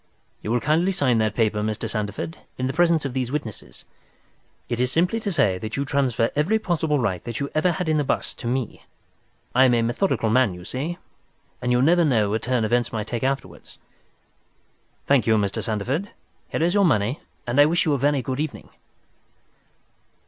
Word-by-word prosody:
"You - - -5
will 120 +2 +2
kindly 160 - +2
sign 130 -11 +2
that 110 -2 0
paper, 110 -2 +1
Mr. 110 0 -2
Sandeford, 105 - -4 0.2
in 130 - -2
the 130 - -1
presence 170 -3 +3
of 135 - -3
these 130 -2 -2
witnesses. 110 - -6 0.8
It 120 - -3
is 125 0 +1
simply 180 - +1
to 210 -2 -3
say 95 - +2
that 110 +4 -5
you 140 - -1
transfer 130 -5 +1
every 160 +10 +2
possible 165 -7 0
right 100 -9 -1
that 115 -1 -5
you 140 0 -3
ever 170 +3 +2
had 170 +1 -3
in 155 -1 +2
the 150 - +2
bust - - -2
to 120 - -5
me. 125 -1 -3 0.7
I 130 +2 +6
am 125 -2 +4
a 115 - +2
methodical 120 - 0
man, 120 -6 +3
you 90 0 -11
see, 145 - -4 0.6
and 125 - 0
you 125 +1 +3
never 170 +4 +4
know 110 -9 +2
what 110 +1 0
turn 125 -2 0
events 120 +2 +1
might 110 -2 -3
take 115 0 -4
afterwards. 135 +1 -4 1.3
Thank 140 -4 +3
you, 110 - +5
Mr. 100 -2 -1
Sandeford; 125 - -2 0.4
here - - -1
is 175 +2 +2
your 200 -1 +4
money, 125 - +2 0.3
and 120 +4 +3
I 145 - +7
wish 170 +3 +2
you 155 - +2
a 140 - 0
very 140 -1 +1
good 130 +2 -3
evening." 155 -1 -4
130 Hz, 200 wpm, -23 LUFS, 115-155 Hz, 1.3 s, I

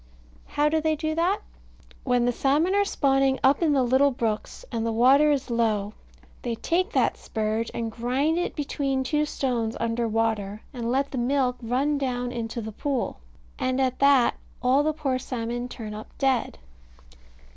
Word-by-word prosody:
How 295 +1 +1
do 315 +1 +1
they 315 0 +1
do 310 +1 -2
that? 360 +6 +1 0.6
When 245 -2 +2
the 245 - +3
salmon 290 +9 +2
are 405 0 +4
spawning 270 -7 +2
up 275 +4 +4
in 315 -3 +3
the 270 -2 +3
little 260 +3 +4
brooks, 225 -4 -3
and 230 -1 -2
the 230 - 0
water 265 +6 +5
is 275 -3 -1
low, 215 -3 0 0.5
they 235 -2 -2
take 360 - 0
that - - +2
spurge, 220 +1 -2
and 230 -1 -3
grind 260 +8 0
it 355 - -2
between 275 -2 -1
two 300 +3 +1
stones 240 -6 -2
under 230 0 0
water, 215 -2 -1
and 235 -2 -3
let 275 +2 0
the 260 - -2
milk 250 0 +1
run 270 +5 0
down 245 -2 -2
into 235 -1 -4
the 220 0 -6
pool; 265 - -2 0.4
and 255 +1 0
at 260 -1 0
that 275 -3 +4 0.2
all 255 +3 +3
the 310 +1 +1
poor 280 -4 -1
salmon 240 0 -4
turn 220 -3 -7
up 215 +1 -8
dead. 265 -3 0
255 Hz, 175 wpm, -25 LUFS, 230-285 Hz, 0.6 s, water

